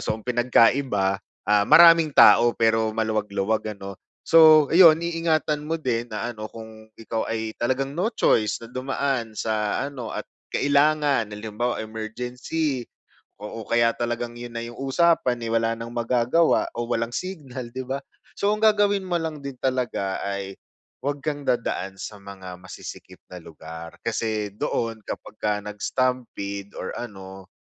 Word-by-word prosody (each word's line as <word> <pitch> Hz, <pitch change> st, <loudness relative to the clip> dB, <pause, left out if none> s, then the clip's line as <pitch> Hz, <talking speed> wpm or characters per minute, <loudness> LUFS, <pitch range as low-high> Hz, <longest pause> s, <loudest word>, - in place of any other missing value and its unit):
So 110 Hz, -, -2 dB
ang 110 Hz, -, -14 dB
pinagkaiba, 120 Hz, -4 st, +2 dB, 0.2 s
ah, 105 Hz, -1 st, +3 dB
maraming 165 Hz, -3 st, +7 dB
tao 120 Hz, 0 st, +7 dB
pero 110 Hz, -1 st, +2 dB
maluwag-luwag, 110 Hz, -1 st, -1 dB
ano. 100 Hz, 0 st, -8 dB, 0.3 s
So, 155 Hz, -3 st, +7 dB
ayun, 165 Hz, -2 st, +7 dB
iingatan 165 Hz, -3 st, 0 dB
mo 160 Hz, +1 st, -2 dB
din 120 Hz, -4 st, -1 dB
na, 110 Hz, 0 st, -4 dB
ano, 110 Hz, -2 st, -8 dB
kung 110 Hz, -1 st, -12 dB
ikaw 115 Hz, 0 st, -3 dB
ay 110 Hz, -1 st, -4 dB
talagang 135 Hz, +4 st, -1 dB
no 215 Hz, +7 st, 0 dB
choice 110 Hz, -, +2 dB
na 115 Hz, -, -9 dB
dumaan 130 Hz, -2 st, -2 dB
sa 110 Hz, -1 st, -1 dB
ano, 135 Hz, -5 st, -5 dB
at -, -, -6 dB, 0.3 s
kailangan, 145 Hz, -5 st, +2 dB
halimbawa, 110 Hz, +3 st, -3 dB
emergency 125 Hz, +6 st, -3 dB, 0.6 s
Oo, 110 Hz, +1 st, -7 dB
kaya 115 Hz, 0 st, +3 dB
talagang 120 Hz, 0 st, -3 dB
'yon 120 Hz, 0 st, -8 dB
na 115 Hz, -, -3 dB
'yong 120 Hz, 0 st, -9 dB
usapan, 135 Hz, -3 st, +2 dB
eh, 115 Hz, -, -3 dB
wala 115 Hz, 0 st, +1 dB
nang 115 Hz, 0 st, -7 dB
magagawa 120 Hz, +7 st, +2 dB
o 120 Hz, -, -1 dB
walang 115 Hz, 0 st, -1 dB
signal, 135 Hz, -10 st, -6 dB
'di 130 Hz, 0 st, -4 dB
ba? 135 Hz, +1 st, -1 dB, 0.4 s
So 200 Hz, +1 st, +2 dB
ang 215 Hz, -, -6 dB
gagawin 205 Hz, -2 st, +4 dB
mo 175 Hz, -, +1 dB
lang 160 Hz, -2 st, -4 dB
din 140 Hz, -2 st, -6 dB
talaga 125 Hz, -7 st, -1 dB
ay 100 Hz, -1 st, -4 dB, 0.5 s
'wag 145 Hz, +1 st, -2 dB
kang 145 Hz, -2 st, -2 dB
dadaan 95 Hz, -5 st, -1 dB
sa 105 Hz, +1 st, -7 dB
mga 95 Hz, -2 st, -10 dB
masisikip 95 Hz, -, -10 dB
na 90 Hz, -, -8 dB
lugar. 80 Hz, +1 st, -10 dB
Kasi 110 Hz, -2 st, -2 dB
doon 115 Hz, +1 st, -2 dB
kapagka 105 Hz, -1 st, -3 dB
nag-stampede 105 Hz, -2 st, -3 dB
or 95 Hz, -, -4 dB
ano, 95 Hz, -4 st, -9 dB
120 Hz, 150 wpm, -24 LUFS, 110-140 Hz, 0.6 s, maraming